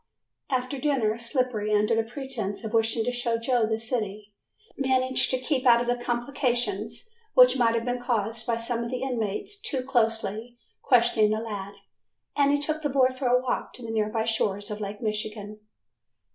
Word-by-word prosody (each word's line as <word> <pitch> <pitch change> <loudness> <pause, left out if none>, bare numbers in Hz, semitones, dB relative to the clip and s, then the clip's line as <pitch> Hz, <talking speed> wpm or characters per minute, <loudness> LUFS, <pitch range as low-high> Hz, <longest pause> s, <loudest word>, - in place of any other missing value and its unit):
After 255 +1 -1
dinner 245 -7 +1
Slippery 235 -3 -1
under 210 +2 +2
the 225 - +3
pretense 240 -4 -5
of 220 0 -5
wishing 225 0 +2
to 245 - 0
show 240 -1 -1
Joe 230 -1 +1
the 220 0 0
city, 215 -3 -4 0.4
managed 260 -1 +2
to 255 - +3
keep 260 0 -1
out 235 0 +5
of 245 0 0
complications 240 - -1 0.3
which 250 0 +8
might 235 -3 +3
have 230 0 -1
been 245 0 -2
caused 225 -2 -1
by 230 -1 +1
some 230 0 -2
of 235 - -4
the 255 0 -3
inmates 240 - -3
too 265 -3 -2
closely 225 -2 -1 0.2
questioning 235 -4 +4
the 215 - +1
lad, 205 -3 -5 0.6
and 285 0 +3
he 290 - +3
took 310 +2 -1
the 295 - -1
boy 260 -1 +4
for 255 0 -3
a 250 +1 +4
walk 255 0 -3
to 250 - -11
the 225 - -5
nearby 220 0 0
shores 205 -2 0
of 210 0 -5
Lake 205 0 -5
Michigan. 215 -1 -4
235 Hz, 180 wpm, -26 LUFS, 220-255 Hz, 0.6 s, which